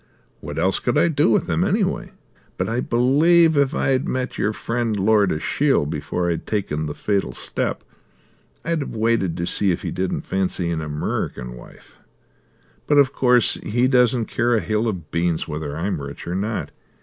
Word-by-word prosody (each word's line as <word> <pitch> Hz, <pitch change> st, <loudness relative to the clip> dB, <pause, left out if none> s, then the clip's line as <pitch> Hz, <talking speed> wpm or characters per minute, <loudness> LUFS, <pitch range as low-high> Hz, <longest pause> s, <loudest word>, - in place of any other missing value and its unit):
What -, -, -7 dB
else -, -, +1 dB
could -, -, 0 dB
I 170 Hz, -, +4 dB
do 145 Hz, -5 st, +2 dB
with 110 Hz, -, +2 dB
them -, -, 0 dB
anyway? -, -, 0 dB, 0.5 s
But -, -, -1 dB
I 115 Hz, +2 st, -1 dB
believe 155 Hz, +8 st, +4 dB
if 140 Hz, -1 st, +2 dB
I'd 130 Hz, -1 st, +1 dB
met 130 Hz, 0 st, -2 dB
your 105 Hz, -, 0 dB
friend, 115 Hz, -1 st, -2 dB
Lord 100 Hz, -1 st, +3 dB
Ashiel, 135 Hz, -, +1 dB
before 75 Hz, +4 st, -2 dB
I'd 85 Hz, -1 st, -2 dB
taken 80 Hz, -8 st, -2 dB
the 75 Hz, -, -5 dB
fatal 100 Hz, -2 st, -1 dB
step, -, -, -3 dB, 0.8 s
I'd 165 Hz, -1 st, 0 dB
have 140 Hz, -, -5 dB
waited 110 Hz, -6 st, +1 dB
to 85 Hz, -, -2 dB
see 95 Hz, +3 st, +1 dB
if 85 Hz, -, -1 dB
he -, -, -3 dB
didn't 95 Hz, 0 st, -2 dB
fancy 95 Hz, -2 st, -1 dB
an 80 Hz, -, -1 dB
Amurrican 75 Hz, -4 st, -3 dB
wife. -, -, -15 dB, 0.9 s
But 145 Hz, -, +3 dB
of 140 Hz, -2 st, +5 dB
course 125 Hz, -3 st, +3 dB
he 120 Hz, +4 st, +1 dB
doesn't 125 Hz, -2 st, +3 dB
care 120 Hz, +1 st, +1 dB
a -, -, +3 dB
hill 105 Hz, +5 st, -1 dB
of 90 Hz, -8 st, -4 dB
beans 85 Hz, -1 st, 0 dB
whether 75 Hz, -1 st, -4 dB
I'm 90 Hz, -1 st, -2 dB
rich 70 Hz, 0 st, -8 dB
or 85 Hz, -, -3 dB
not. 105 Hz, +4 st, -2 dB
105 Hz, 180 wpm, -22 LUFS, 85-125 Hz, 0.9 s, of